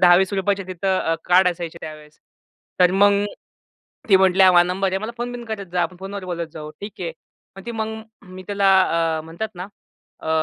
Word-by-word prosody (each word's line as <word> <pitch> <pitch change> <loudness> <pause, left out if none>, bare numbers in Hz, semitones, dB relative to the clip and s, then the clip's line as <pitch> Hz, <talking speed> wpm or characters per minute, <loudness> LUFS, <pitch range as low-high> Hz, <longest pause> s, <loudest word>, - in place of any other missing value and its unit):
₹10-20चे 190 +2 +3
तिथं 185 +1 -1
अ, 165 - 0
कार्ड 180 +1 +5
असायचे 170 -1 -5
त्यावेळेस. 155 -1 -10 0.6
तर 180 - +6
मग 200 +1 +4 0.9
ती 195 - +7
म्हटली 190 0 +4
हा 185 - +8
माझा 175 -1 +6
नंबर 195 0 0
आहे. 190 - 0
मला 220 +3 -5
फोन-बिन 240 0 -5
करत 210 -4 -5
जा, 180 - +2
आपण 180 +1 -3
फोनवर 195 0 -6
बोलत 170 -2 -4
जाऊ, 150 -1 -7
ठीक 205 +1 -7
आहे. 170 -2 -3 0.5
मग 195 - -11
ती 235 - -4
मग 220 -1 -3 0.4
मी 185 - -9
त्याला 200 -1 0 0.5
अ, - - -6
म्हणतात 170 +7 -5
ना 180 +2 -6 0.5
अ, 160 - -5
190 Hz, 190 wpm, -22 LUFS, 175-200 Hz, 0.9 s, हा